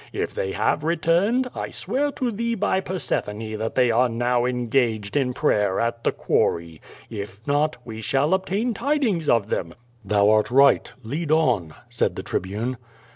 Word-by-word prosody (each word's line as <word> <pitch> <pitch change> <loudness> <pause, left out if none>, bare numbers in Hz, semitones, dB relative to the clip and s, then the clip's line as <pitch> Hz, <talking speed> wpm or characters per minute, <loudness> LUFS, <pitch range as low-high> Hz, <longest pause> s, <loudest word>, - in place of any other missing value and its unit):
If - - -3
they 95 0 -2
have 150 - 0
re 165 +2 +1
turned, 195 +11 +2
1 - - -5
swear 285 +2 -1
to 250 -2 -1
thee 235 +2 -1
by 200 -2 +1
Persephone 110 - -3
that 110 +1 -3
they 125 -2 +4
are 125 +2 +3
now 120 +1 +1
engaged 120 -3 0
in 135 -3 +2
prayer 105 -8 +1
at 115 0 -1
the - - +2
quarry. 85 -2 -1 0.3
If 100 -2 -6
not 145 +2 +1
we 110 -2 -7
shall 140 - +1
obtain 200 +5 0
tid 285 +7 0
ings 175 - 0
of 110 -3 +2
them/' 85 -2 -2 0.3
"Thou 100 +1 +3
art 110 -1 +3
right. 140 +2 +4
Lead 145 +8 -4
on!" 120 - +2 0.2
said - - 0
the - - -5
Tribune. 110 +7 -3
125 Hz, 175 wpm, -23 LUFS, 110-170 Hz, 0.3 s, they